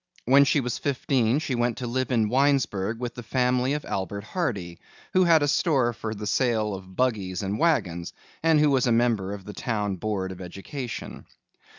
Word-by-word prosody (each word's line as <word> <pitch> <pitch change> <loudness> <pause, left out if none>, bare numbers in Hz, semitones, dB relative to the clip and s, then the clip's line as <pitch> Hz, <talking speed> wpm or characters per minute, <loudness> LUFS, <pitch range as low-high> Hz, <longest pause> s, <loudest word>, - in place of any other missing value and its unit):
When 140 +3 +6
she 145 0 +2
was 125 -2 -3
fifteen 130 -3 +1
she 150 -3 -2
went 120 -1 0
to 125 - -4
live 130 +2 -2
in 115 -3 +2
Winesburg 125 -5 +1
with 120 -1 -4
the 120 - -8
family 125 +2 +1
of 150 - -3
Albert 100 +1 -3
Hardy, 105 - -3 0.3
who 185 0 +4
had 165 -3 +5
a - - +2
store 140 -5 +2
for 110 0 -5
the 105 +1 -6
sale 110 -2 +1
of 95 -1 -9
buggies 100 -7 -1
and 100 +3 -2
wagons, 95 - +1 0.3
and 160 -1 +4
who 150 -1 +4
was 130 -2 +2
a - - +3
member 115 -5 +2
of 100 -2 -7
the 105 - -7
town 105 -6 -2
board 95 -1 -2
of 95 0 -9
education. 115 +8 -7
120 Hz, 195 wpm, -26 LUFS, 100-135 Hz, 0.3 s, When